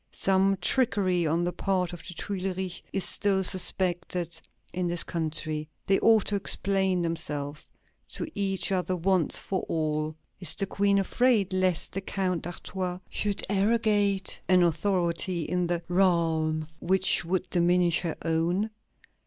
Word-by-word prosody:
Some 195 0 +2
trickery 185 -6 +1
on 165 +3 +1
the 175 - 0
part 185 -3 -1
of 175 - -8
the 175 - -8
Tuileries 190 -1 -4
is 195 - -1
still 195 -2 0
suspected 180 -2 0 0.3
in 180 0 -1
this 175 0 +1
country. 155 -2 -3 0.2
They 195 - +3
ought 225 -3 +4
to 205 - 0
explain 190 -2 +1
themselves 150 -3 -3 0.4
to - - -3
each 195 -2 -1
other 185 -1 0
once 180 -2 +1
for 190 - -3
all. 155 -1 -1 0.2
Is 180 - +5
the 195 - 0
Queen 200 +1 +1
afraid 205 -1 +2
lest 185 -2 0
the 195 - -2
Count 185 -3 -2
d'Artois 180 +1 -4
should 205 -1 -1
arrogate 205 -1 +2
an 180 -1 +5
authority 170 0 0
in 180 +2 -1
the 170 0 -1
realm 165 -4 +1
which 190 0 +2
would 180 +2 -1
diminish 175 -1 +3
her 170 -3 -3
own? 170 +6 0
180 Hz, 140 wpm, -27 LUFS, 170-195 Hz, 0.4 s, Is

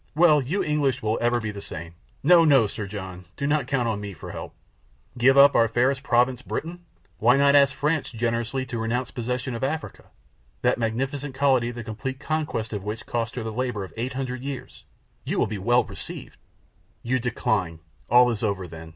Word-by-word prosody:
"Well, 155 -2 +5
you 160 +10 -1
English 145 -5 0
will 110 +1 0
ever 120 0 +2
be 110 -2 -4
the 100 -1 -8
same. 85 -2 -7 0.3
No, 170 +3 +7
no, 140 -7 +5
Sir 105 0 -5
John, 95 -3 -7
do 140 - -2
not 145 -3 +1
count 130 -4 0
on 105 -2 -2
me 100 -1 -6
for - - -9
help. - - -8 0.6
Give 130 +3 +4
up 140 +1 +8
our 115 - +4
fairest 125 +4 +1
province, 125 -1 +2
Britain? 170 +7 -5 0.4
Why 120 +4 +5
not 140 0 +5
ask 140 -1 +5
France 150 0 0
generously 115 +2 -1
to 120 -2 -5
renounce 120 +2 -2
possession 125 +1 -3
of 115 - -5
Africa, 155 +4 -3 0.6
that - - +2
magnificent 130 +5 -2
colony 130 -3 +3
the 120 -1 -6
complete 130 +5 -5
conquest 150 -7 -2
of 100 -2 -4
which 105 +2 -5
cost 115 -1 -3
her 120 - -3
the 110 - -4
labor 120 -4 -2
of 95 - -10
800 130 +1 -3
years? 135 -1 -7 0.4
You - - -2
will - - +3
be 105 -2 -5
well 120 +5 +3
received!" - - -9 0.7
"You 130 +2 0
decline! 105 -8 -1 0.3
All 125 +1 +6
is 110 - -4
over 100 -5 -1
then!" 80 -1 -10
125 Hz, 195 wpm, -25 LUFS, 110-135 Hz, 0.7 s, up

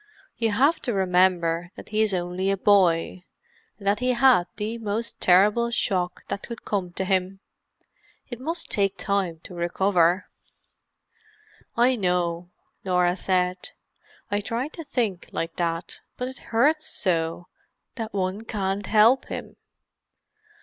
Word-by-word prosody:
You 230 -1 0
have 280 +9 +3
to 240 -5 -2
remember 180 -2 +2
that - - -11
he 215 +1 +1
is 215 -1 +2
only 180 +1 -1
a 195 - +1
boy, 185 -3 +3 0.5
and 200 - -13
that 200 +1 +2
he 250 0 +1
had 245 -7 +5
the 220 +2 -3
most 225 +2 -3
terrible 205 +6 +4
shock 185 -6 -1
that 200 - -4
could 235 -2 -9
come 190 -4 -2
to 190 - -2
him. 190 0 0 0.9
It 240 -2 -7
must 330 +6 -2
take 195 -2 +1
time 180 -4 -1
to - - -10
recover." 175 +1 +2 1.5
"I 250 +2 +4
know," 180 -4 -1 0.3
Norah 180 -1 +2
said. 180 -1 -1 0.6
"I 205 0 +1
tried 235 +8 -3
to 330 - -7
think 235 - -2
like 165 0 -4
that—but 170 +8 -4
it 260 +1 -8
hurts 300 +7 +2
so, 165 -2 -1 0.5
that 225 -3 -5
one 190 +1 -2
can't 200 -2 -3
help 225 +5 +5
him. - - -7
195 Hz, 135 wpm, -25 LUFS, 180-230 Hz, 1.5 s, had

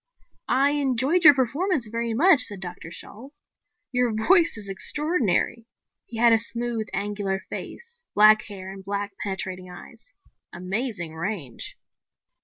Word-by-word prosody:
"I 275 +2 +3
enjoyed 285 +4 +1
your 295 -3 +9
performance 275 - 0
very 230 +1 -3
much," 325 +3 +5
said 205 -5 -1
Dr. 175 -3 -7
Shalt. 250 - -9 0.6
"Your 250 -2 +1
voice 330 - +4
is 205 -2 -6
extraordinary." 230 - 0 0.4
He 230 - -7
had 235 0 +5
a 225 - +5
smooth, 235 -1 -3
angular 200 -1 -2
face, 475 0 -8
black 215 +1 +7
hair 190 -2 -8
and 195 0 -10
black, 200 +1 -3
penetrating 185 -2 -5
eyes. 180 - -13 0.4
"Amazing 185 -1 -4
range." 160 - -5
225 Hz, 130 wpm, -24 LUFS, 195-265 Hz, 0.6 s, your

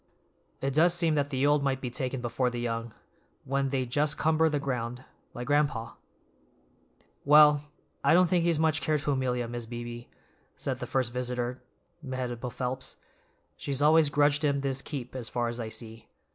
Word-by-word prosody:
It 135 0 -1
does 170 +4 +4
seem 165 -2 +2
that 145 -1 0
the 135 0 0
old 145 0 +4
might 135 -1 0
be 125 -2 -5
taken 130 +1 -3
before 120 +1 0
the 120 0 -5
young, 115 -1 -3 0.5
when 135 0 0
they 130 -1 -1
just 145 +5 +1
cumber 160 +1 +3
the 150 -1 0
ground, 125 -2 -3 0.3
like 120 - -5
gran'pa." 145 -6 0 1.3
"Well, 150 0 +6 0.3
I 140 +4 +5
don't 180 +1 +6
think 175 0 +2
he's 170 -2 +2
much 160 0 +2
care 155 -1 +1
to 145 0 -1
Amelia, 125 -3 -1
Mis' 120 -1 -6
Beebe," 120 0 -7 0.5
said - - -3
the - - -5
first 130 -3 -1
visitor, 125 0 -3 0.4
Mehitable 130 -3 -4
Phelps. 130 +1 -4 0.6
"She's 140 -2 -3
always 155 +1 +5
grudged 145 +1 +2
him 140 -1 +2
his 135 -1 -2
keep, 135 -5 -6
as 125 -3 -4
far 120 -1 -1
as 120 +1 -6
I 115 -2 -4
see. 115 0 -8
135 Hz, 175 wpm, -28 LUFS, 120-150 Hz, 1.3 s, Well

